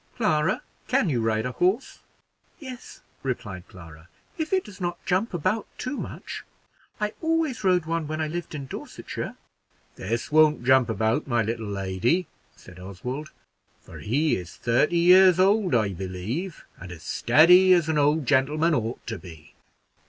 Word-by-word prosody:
"Clara, 165 -6 +1 0.2
can 260 -7 +2
you 125 -5 0
ride 110 0 0
a 125 - -2
horse?" 185 - 0 0.6
"Yes," 260 -4 -10 0.2
replied 105 -8 -5
Clara, 80 -3 -14 0.3
"if 315 -1 -4
it 380 -1 +2
does 205 -3 -13
not 175 -1 -2
jump 195 +5 0
about 195 +6 -1
too 255 +3 -4
much. - - -7 0.6
I 210 0 -1
always 320 -8 0
rode 180 -3 +3
one 165 -1 -2
when 155 +1 -4
I 155 - 0
lived 170 0 -5
in 140 -2 -5
Dorsetshire." - - -7 0.6
"This 115 +8 -3
won't 155 -3 +4
jump 130 -1 +4
about, 110 +6 0
my 120 -3 +1
little 115 0 -3
lady," 100 - 0 0.3
said - - -15
Oswald, 125 +11 -6 0.5
"for - - -12
he 145 +8 +1
is 90 -1 -9
thirty 125 +8 +1
years 180 +1 +6
old, 195 - +3
I 110 -4 +2
believe, 95 - -5
and 90 0 -9
as 85 -1 -10
steady 175 - +5
as 175 -3 +4
an 160 -2 +1
old 145 +1 +2
gentleman 150 +5 +2
ought 115 -3 -2
to 115 - -5
be." 80 -4 -13
150 Hz, 160 wpm, -25 LUFS, 115-180 Hz, 0.6 s, years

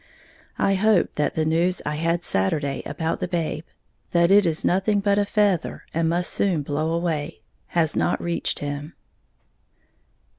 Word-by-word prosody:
I 195 - +2
hope 200 -1 +2
that 150 - -1
the 160 - +1
news 170 +3 +1
I 150 - -1
had 165 +2 0
Saturday 140 - 0
about 160 0 -2
the - - -2
babe, 165 -3 -2 0.5
that 170 +1 +4
it 200 -2 +6
is 160 -1 0
nothing 195 +3 +2
but 200 0 +2
a 205 - +2
feather, 200 -6 0
and 165 0 +1
must 175 +1 0
soon 180 -7 +1
blow 150 +3 -1
away 165 -2 -2 0.2
has 165 -3 +1
not 175 - +1
reached 170 0 -2
him. 145 +2 -5
170 Hz, 155 wpm, -23 LUFS, 155-185 Hz, 0.5 s, it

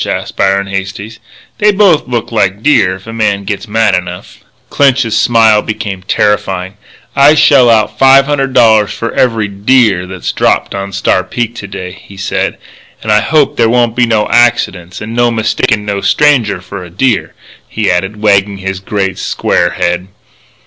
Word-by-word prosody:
asked - - -4
Byron 100 0 +1
Hastings. 100 +3 -6 0.4
"They 210 0 +4
both 195 -8 +2
look 120 -2 -3
like 100 -2 -1
deer 100 -11 +2
if 95 - -14
a 115 - -8
man 105 -3 -1
gits 100 +3 -5
mad 110 -1 +1
enough." 90 -1 -5 0.3
Clinch's 135 -5 +1
smile 115 -3 +3
became 100 -4 -5
terrifying. 95 -1 -1 0.4
"I 140 +2 +5
shell 135 -5 +5
out 110 -2 +1
five 135 0 +6
hundred 135 -2 -1
dollars 110 -4 +4
for 115 - -5
every 115 -4 0
deer 100 -2 +1
that's 95 -1 -5
dropped - - 0
on 100 0 -5
Star 95 -1 0
Peak 115 +5 -4
to 105 -4 -8
day," 95 -2 -7
he 95 +1 -15
said. 100 - -2 0.5
"And 110 - -1
I 105 - +4
hope 155 -3 +1
there 115 -1 +3
won't 120 -1 +1
be 120 -1 +2
no 110 -2 +1
accidents 100 -7 0
and 110 +2 -6
no 120 0 +2
mistakin' 110 -2 -1
no 100 -1 -3
stranger 135 -11 +1
for 90 +1 -8
a 90 - -11
deer," 105 +5 -1 0.3
he 110 -3 -1
added, 95 +4 -2
wagging 100 -1 +2
his 95 0 -5
great, 95 -1 -3
square - - 0
head. 90 +1 -2
105 Hz, 170 wpm, -11 LUFS, 95-120 Hz, 0.5 s, five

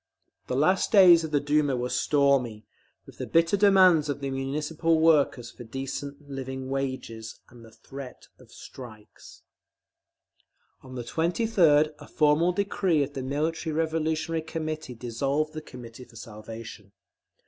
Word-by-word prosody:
The 125 - -2
last 180 +8 +2
days 180 -5 +7
of 160 - -4
the 150 -1 +1
Duma 145 -2 +1
were 125 0 -2
stormy 135 -7 +1 0.4
with - - -16
the - - -4
bitter 165 +3 +3
demands 185 -6 +5
of 145 - -2
the 140 -1 -4
Municipal 150 +4 -1
workers 145 -7 +2
for 120 - -11
decent 140 +4 -7
living 130 -1 -6
wages, 130 -5 -5
and 120 -1 -16
the 115 - -14
threat 135 +3 -11
of - - -19
strikes…. 110 -5 -13 1.4
On 130 -1 -11
the 120 - -5
23d 165 - +2
a - - -12
formal 155 +3 +2
decree 185 -4 0
of 140 +1 -7
the 135 - -5
Military 155 +4 -2
Revolutionary 160 0 -1
Committee 155 -4 -5
dissolved 135 +6 -2
the 155 - -6
Committee 125 -3 -11
for 115 - -21
Salvation. 110 -1 -10
145 Hz, 140 wpm, -26 LUFS, 125-160 Hz, 1.4 s, days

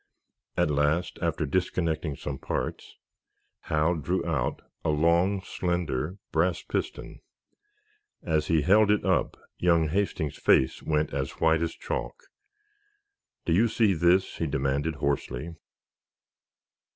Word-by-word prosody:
At 75 - +2
last, 75 +4 0
after 85 -2 0
disconnecting 80 -1 -1
some 70 0 -5
parts, - - -4 0.7
Hal 80 +2 +2
drew 85 +3 -1
out 75 -8 -1 0.2
a - - 0
long, 85 +6 +2
slender 85 -2 -2
brass 85 +3 +1
piston. - - -4 1.0
As 80 -2 0
he 80 -3 +2
held 105 +5 +5
it 105 0 +2
up - - +1 0.2
young 85 -3 +3
Hastings's 80 -5 -1
face 65 - +3
went 75 -1 0
as 70 -1 -3
white 80 0 +3
as 85 -1 -2
chalk. - - -4 1.3
"Do 85 - +1
you 110 +7 +4
see 110 -2 +2
this?" 90 +3 +2
he 80 - -1
demanded, 70 +3 -1
hoarsely. 70 +1 -2
80 Hz, 120 wpm, -27 LUFS, 75-90 Hz, 1.3 s, held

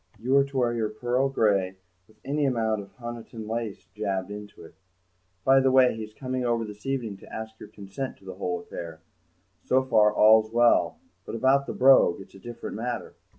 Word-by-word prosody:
You 125 +5 0
are 140 - +6
to 140 -1 -7
wear 120 -2 +2
your 110 -2 -1
pearl 120 +5 0
grey, 100 -7 +1 0.3
with 110 - -24
any 145 +1 0
amount 110 -4 0
of 100 - -12
Honiton 120 -2 -8
lace 115 -2 -4
jabbed 100 -2 -3
into 105 0 -9
it. - - -15 0.7
By 135 0 +6
the 135 0 +3
way, 130 -2 +5
he's 110 -1 -7
coming 130 +1 -4
over 120 -2 0
this 105 +4 -10
evening 120 -7 -2
to - - -16
ask 110 0 -7
your - - -11
consent 100 +7 -7
to - - -21
the 95 - -7
whole 90 -2 -3
affair. 85 -2 -8 0.6
So 130 +1 +2
far 110 -5 +4
all's 110 +1 +5
well, 120 - +3 0.3
but - - -7
about 135 +3 +2
the - - -3
Brogue 130 -9 +5
it's 95 - -13
a 95 - -13
different 120 +2 -7
matter. 120 +2 -4
115 Hz, 195 wpm, -26 LUFS, 105-130 Hz, 0.7 s, are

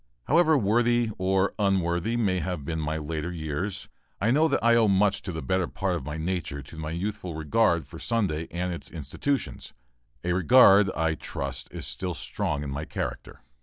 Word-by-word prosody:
However 160 +1 +4
worthy 120 +1 +2
or 95 +1 +2
unworthy 95 +2 +1
may 95 -6 +1
have 90 -6 -4
been 80 -1 -2
my 80 0 -2
later 80 +2 -3
years, 85 +4 -3 0.3
I 110 +4 +2
know 155 +5 +4
that - - 0
I 115 0 +5
owe 115 -2 +5
much 100 +1 +2
of 90 - -3
the 80 - -4
better 95 -2 0
part 95 -1 -2
of 85 - -3
my 75 +3 -5
nature 80 -4 -3
to 70 - -13
my 80 -1 -5
youthful 90 +1 -4
regard 85 +2 +2
for 80 - -11
Sunday 95 -9 -1
and 90 +1 -2
its 85 - -7
institutions 85 - -3 0.5
a 90 0 0
regard, 100 +1 +6
I 80 -1 +1
trust, 70 -3 -5
still 90 -2 -3
strong 70 +1 -3
in 70 - -4
my 70 +3 -4
character. - - -5
90 Hz, 180 wpm, -27 LUFS, 80-105 Hz, 0.5 s, regard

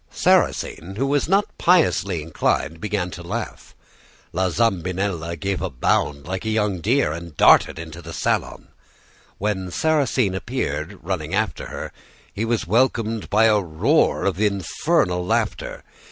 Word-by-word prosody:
"Sarrasine, 90 +4 +1
who 130 +6 0
was 145 +2 0
not 195 +2 +4
piously 100 - +3
inclined, 80 0 -1
began 100 -4 -2
to 85 - -8
laugh. 85 - -6 0.6
La 95 +1 +1
Zambinella 90 -4 -1
gave 95 +4 -2
a - - -2
bound 70 +3 0
like 95 +2 -4
a 110 - -2
young 105 -4 0
deer, 120 - +2
and 85 -1 -8
darted - - +5
into 80 +1 -8
the 80 - -9
salon. - - -2 0.7
When 95 -3 -2
Sarrasine 130 - +1
appeared, 95 -3 -3
running 85 -1 -3
after 110 +1 -1
her, - - -6 0.4
he 110 - -2
was 115 0 0
welcomed 115 +1 +1
by 110 +2 +4
a 105 -2 +5
roar 80 -3 +1
of 95 - 0
infernal 100 - +1
laughter. 90 - -2
95 Hz, 140 wpm, -22 LUFS, 85-110 Hz, 0.7 s, darted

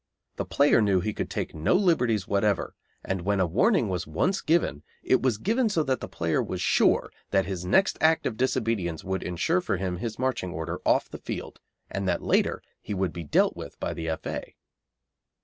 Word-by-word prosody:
The - - -2
player 140 -4 +4
knew 100 -3 +3
he 105 +4 -2
could - - -4
take - - -3
no 80 - +1
liberties 125 - +2
whatever, 100 0 +1 0.3
and 95 -1 -2
when 100 +2 0
a 95 - +4
warning 120 - +2
was 90 0 -3
once 190 +1 0
given 160 - +1 0.2
it 130 - +3
was 130 -5 +1
given 225 - +1
so 165 -6 +1
that 130 -3 0
the - - -6
player 85 -1 0
was - - -4
sure - - +3 0.2
that 95 -1 +2
his 90 -2 -4
next 190 - +3
act 160 0 +4
of 115 - -1
disobedience 115 -9 -1
would 95 0 -2
ensure 125 - 0
for 135 - -1
him 90 -1 -2
his 110 +4 -4
marching 125 -9 -1
order 85 0 -4
off - - +3
the - - -7
field, - - -6 0.3
and 95 -1 -3
that - - 0
later - - +1 0.2
he 105 - -4
would 95 -3 -1
be 85 - -5
dealt 75 - +2
with - - -9
by - - -2
the 80 0 -4
F.A. 80 - -5
100 Hz, 200 wpm, -27 LUFS, 90-130 Hz, 0.3 s, player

